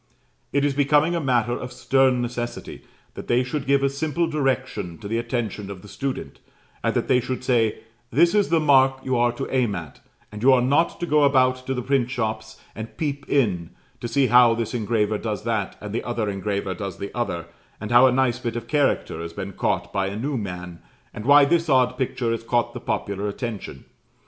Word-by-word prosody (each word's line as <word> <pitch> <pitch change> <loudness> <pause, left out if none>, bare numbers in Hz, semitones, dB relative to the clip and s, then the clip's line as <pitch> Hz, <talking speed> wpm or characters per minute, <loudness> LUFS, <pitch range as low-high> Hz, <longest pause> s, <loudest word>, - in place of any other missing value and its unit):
It 140 0 +2
is 145 - +1
becoming 145 +4 +3
a - - 0
matter 120 -4 +1
of 125 +1 -5
stern 125 0 +2
necessity 120 0 -5 0.3
that - - -9
they 120 +1 +3
should 135 +2 -4
give 140 0 +3
a - - +4
simple 160 +4 -1
direction 130 - -2
to 100 - -8
the 115 +2 -1
attention 115 -4 -3
of 95 -2 -8
the - - -11
student, 130 +7 -5 0.4
and - - 0
that - - 0
they 125 - +4
should 125 +1 -4
say, 115 -4 +1 0.3
"This 170 +7 +4
is 205 -1 +2
the 165 0 +3
mark 135 -3 +4
you 130 -1 0
are 120 0 +3
to 135 +3 -4
aim 120 -6 +1
at; 80 -5 -8 0.3
and 105 0 -8
you 130 +2 +6
are 125 - +4
not 145 +6 +2
to - - 0
go 150 -2 +3
about 130 -2 +3
to 130 - -1
the 125 - -3
print 135 -2 +1
shops, 110 -3 -4 0.2
and 110 0 -8
peep 145 -2 -3
in, 100 - 0 0.2
to - - -4
see 140 +3 +2
how 125 -2 +6
this 115 0 -3
engraver 110 -2 0
does 105 -2 -4
that, 110 -4 -2
and 105 0 -7
the 115 - -2
other 120 -3 -2
engraver 100 -1 -2
does 100 -1 -6
the 100 - -7
other, 85 -9 -2 0.3
and 110 - -6
how 120 +2 +7
a - - +3
nice 125 -1 +1
bit 120 -2 -4
of 120 - -4
character 140 - 0
has 85 0 -6
been 100 +1 -6
caught - - -1
by 95 -1 0
a 100 - -4
new 140 +5 -2
man, 90 -5 -5 0.3
and 105 - -7
why 145 0 +8
this 165 +2 +1
odd 125 -2 +3
picture 125 -2 -1
has 115 - -2
caught 120 0 0
the - - -6
popular 100 +1 -3
attention. 105 - -6
120 Hz, 215 wpm, -23 LUFS, 105-135 Hz, 0.4 s, why